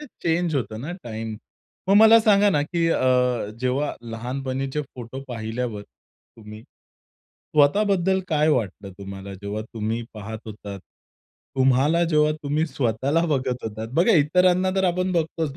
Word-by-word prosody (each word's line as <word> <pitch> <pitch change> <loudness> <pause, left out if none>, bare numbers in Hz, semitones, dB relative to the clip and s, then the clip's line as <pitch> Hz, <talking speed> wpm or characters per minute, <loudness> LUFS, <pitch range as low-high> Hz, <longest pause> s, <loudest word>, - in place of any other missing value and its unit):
ते 300 - -9 0.2
चेंज 170 0 0
होतं 110 -5 -3
ना 150 +8 -5
टाईम. 110 -1 -5 0.5
मग 195 - +5
मला 220 +1 +8
सांगा 205 -1 +4
ना, 150 -6 +2
की 165 +2 -1
अ, - - +1 0.6
जेव्हा 130 +3 -1 0.2
लहानपणीचे 130 +4 -3
फोटो 130 -1 -9
पाहिल्यावर 115 -1 -4
तुम्ही, 110 +1 -16
स्वतःबद्दल 190 - -1
काय 155 -1 +2
वाटलं 105 - -1
तुम्हाला 100 0 -8
जेव्हा 100 +2 -5
तुम्ही 115 +1 -4
पाहत 110 +1 -7
होतात. 100 -2 -8 0.8
तुम्हाला 135 +6 +3
जेव्हा 150 -1 +3
तुम्ही 150 +3 0
स्वतःला 135 +3 0
बघत 130 -5 -1
होतात. 110 0 -5
बघा 175 +9 +4
इतरांना 180 +5 +3
तर 190 - +2
आपण 180 +1 0
बघतोच 160 -3 -2
135 Hz, 135 wpm, -23 LUFS, 110-165 Hz, 0.8 s, मला